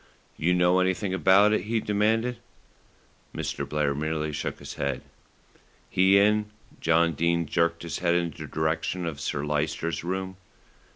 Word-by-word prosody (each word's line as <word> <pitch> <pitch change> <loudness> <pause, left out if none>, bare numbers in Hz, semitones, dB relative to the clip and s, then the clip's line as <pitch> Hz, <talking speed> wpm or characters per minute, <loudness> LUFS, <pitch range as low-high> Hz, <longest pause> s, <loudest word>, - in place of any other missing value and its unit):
"You 90 +3 +1
know 90 +1 +4
anything 95 +1 0
about 95 +3 +5
it?" 100 - 0
he 115 +1 0
demanded. 110 +4 +1 1.0
Mr. - - -4
Blair 75 -2 0
merely 75 +1 -2
shook 75 - -4
his - - -8
head. 70 -1 -3 0.9
"He 95 +1 +5
in?" 105 +1 +3 0.3
John 85 0 +3
Dene 85 +2 +1
jerked 85 +2 0
his 85 - -4
head 85 -1 +2
in 85 -1 0
the - - -9
direction 80 +3 -1
of 75 -4 -5
Sir 70 0 -2
Lyster's 75 +1 -2
room. 95 +1 -3
85 Hz, 150 wpm, -26 LUFS, 80-95 Hz, 1.0 s, about